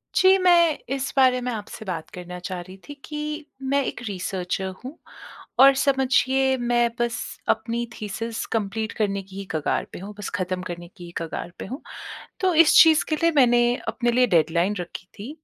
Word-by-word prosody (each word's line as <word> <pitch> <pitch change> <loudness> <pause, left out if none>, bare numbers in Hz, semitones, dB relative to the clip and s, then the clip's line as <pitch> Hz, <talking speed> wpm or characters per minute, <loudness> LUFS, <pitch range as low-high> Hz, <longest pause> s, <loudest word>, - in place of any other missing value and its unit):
जी, 380 +1 +6
मैं 345 -4 +4 0.2
इस 275 0 -3
बारे 255 -1 +5
में 250 0 -2
आपसे 220 -1 -7
बात 170 -5 -5
करना 180 0 -8
चाह 180 0 -5
रही 185 +2 -12
थी 290 - -7
कि 300 0 -5 0.3
मैं 280 0 +3
एक - - -5
रिसर्चर 190 -1 -3 0.2
हूँ 270 +6 -8 0.6
और 275 +1 +9
समझिए 265 0 +2
मैं 240 -1 +2
बस 235 -1 0 0.3
अपनी 235 0 0
थीसिस 225 +2 -4
कंप्लीट 220 +1 -2
करने 200 -2 0
की 190 0 -15
ही 200 - -5
कगार 155 -2 -1
पे - - -7
हूँ 200 +3 -8
बस 205 - -4
ख़त्म 185 0 -2
करने 175 0 -7
की 175 - -10
ही 170 - -10
कगार 165 +1 -5
पे - - -5
हूँ। 260 +9 -7 0.6
तो 370 -3 +2
इस 310 - +3
चीज़ 320 -2 +4
के 310 - +1
लिए 335 - +5
मैंने 240 -2 +5 0.2
अपने 240 -1 0
लिए 250 +1 +4
डेडलाइन 170 +6 +2
रखी 175 +1 -8
थी। 215 +7 -7
235 Hz, 185 wpm, -24 LUFS, 190-270 Hz, 0.6 s, और